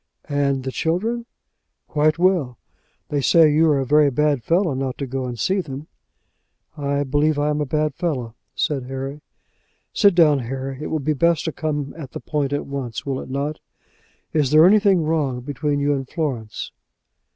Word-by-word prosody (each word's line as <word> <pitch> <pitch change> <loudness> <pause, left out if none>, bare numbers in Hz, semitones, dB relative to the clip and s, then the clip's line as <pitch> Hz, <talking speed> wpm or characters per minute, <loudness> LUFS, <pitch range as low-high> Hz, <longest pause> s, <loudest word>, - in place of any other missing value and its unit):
"And 140 -2 0
the 130 - -3
children?" 220 - -1 0.6
"Quite 155 +1 +2
well. 170 -9 +1 0.5
They 145 -1 0
say 155 +1 +5
you 160 +2 +4
are 145 - +3
a 135 - -1
very 150 +2 +4
bad 145 0 +1
fellow 170 - +1
not 130 -1 -3
to 140 - -3
go 130 0 -3
and 120 -1 -5
see 190 - +1
them." 140 -2 -7 0.9
"I 140 -1 -1
believe 145 +2 +1
I 145 +1 +1
am 150 0 -1
a 145 - -2
bad 150 +1 0
fellow," 135 -9 -3 0.2
said 135 -4 -1
Harry. 135 +3 -5 0.7
"Sit 200 -4 +4
down, 155 -5 +5
Harry. 135 +2 -5
It - - -3
will 160 - -1
be 155 +1 0
best 170 +2 +2
to 160 - -1
come 150 -3 -3
at 150 -5 -9
the - - -5
point 145 -3 -2
at 145 - -2
once; 135 -5 -5
will 135 -2 -2
it - - -10
not? 140 +3 -3 0.7
Is 150 -4 +2
there 155 +3 +7
anything 195 -3 +5
wrong 150 -6 0
between 145 +2 -2
you 145 0 +2
and 135 -2 -4
Florence?" 130 -10 -4
145 Hz, 185 wpm, -22 LUFS, 135-155 Hz, 0.9 s, there